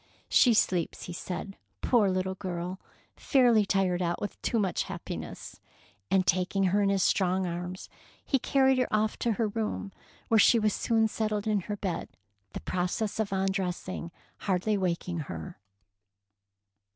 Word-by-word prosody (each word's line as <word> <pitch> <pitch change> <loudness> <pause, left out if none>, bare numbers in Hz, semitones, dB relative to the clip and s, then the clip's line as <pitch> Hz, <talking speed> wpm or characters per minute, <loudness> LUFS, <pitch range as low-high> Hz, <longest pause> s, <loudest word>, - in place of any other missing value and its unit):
" - - -39
She 240 -3 +6
sleeps," 180 -5 +1
he 175 - -6
said, 185 +3 -5
'' - - -47
poor 225 -6 +4
little 185 0 -1
girl, 180 0 -5 0.4
fairly 240 -7 +4
tired 185 -3 +1
out 170 -1 -1
with 205 - -5
too 235 - 0
much 195 -5 0
happiness"; - - -7 0.5
and 190 -1 +3
taking 185 +2 +1
her 205 - +4
in 200 - +3
his 195 -1 +2
strong 185 -1 +2
arms, 180 +1 -5 0.4
he 270 - +2
carried 265 0 +3
her 255 - 0
off 215 0 +1
to 235 - +1
her 220 0 0
room, 210 -2 -3 0.4
where 225 - +4
she 230 - +6
was 215 -2 +2
soon 225 -1 +2
settled 215 -1 -2
in 215 -2 +2
her 205 - -2
bed, 190 -4 -3 0.4
the - - -5
process 185 +4 -2
of 215 -2 0
undressing 190 -2 -2 0.3
hardly 195 +2 0
waking 175 -2 -1
her. 80 -2 -7
195 Hz, 160 wpm, -29 LUFS, 180-215 Hz, 0.5 s, She